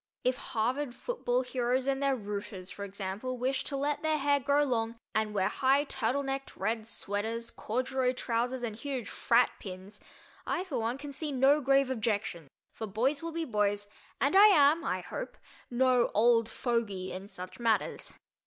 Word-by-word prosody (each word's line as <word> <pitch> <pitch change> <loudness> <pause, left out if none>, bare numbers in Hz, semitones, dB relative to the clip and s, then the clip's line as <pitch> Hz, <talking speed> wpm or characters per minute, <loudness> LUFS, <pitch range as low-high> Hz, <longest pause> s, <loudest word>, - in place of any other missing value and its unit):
If 255 0 +2
Harvard 245 +4 -1
football 260 - -1
heroes 250 0 0
and 275 0 0
their 275 -1 +2
"rooters," 200 -4 -5
for 200 - -7
example, 200 +5 -4
wish 260 +2 0
to 280 - -3
let 290 +1 -1
their 315 -1 +1
hair 285 0 +2
grow 285 +2 +3
long 230 -4 0 0.2
and 215 -1 +1
wear 195 -2 +1
high 270 +2 +3
turtle 265 0 -1
necked 270 0 -4
red 220 0 -1
"sweaters," 225 +3 -3
corduroy 255 +2 -1
trousers 245 +1 -1
and 220 -3 -3
huge 255 -1 -4
"frat" 235 +1 +3
pins, 190 +1 -9 0.4
I, 360 - -1
for 300 -10 -3
one, 230 +3 -1
can 285 0 -8
see 300 +1 -3
no 275 +3 +4
grave 275 0 +3
objection, 210 - -2 0.3
for 220 - -5
"boys 250 +8 0
will 335 0 -4
be 330 0 -2
boys" 205 -3 0 0.3
and 280 +6 +2
I 405 +2 +10
am, 315 -4 +5
I - - -1
hope, - - -6 0.3
no 250 0 +3
"old 230 +1 +4
fogy" 215 -7 -2
in 190 +2 -6
such 185 0 -8
matters. 230 -2 0
245 Hz, 170 wpm, -30 LUFS, 220-275 Hz, 0.4 s, I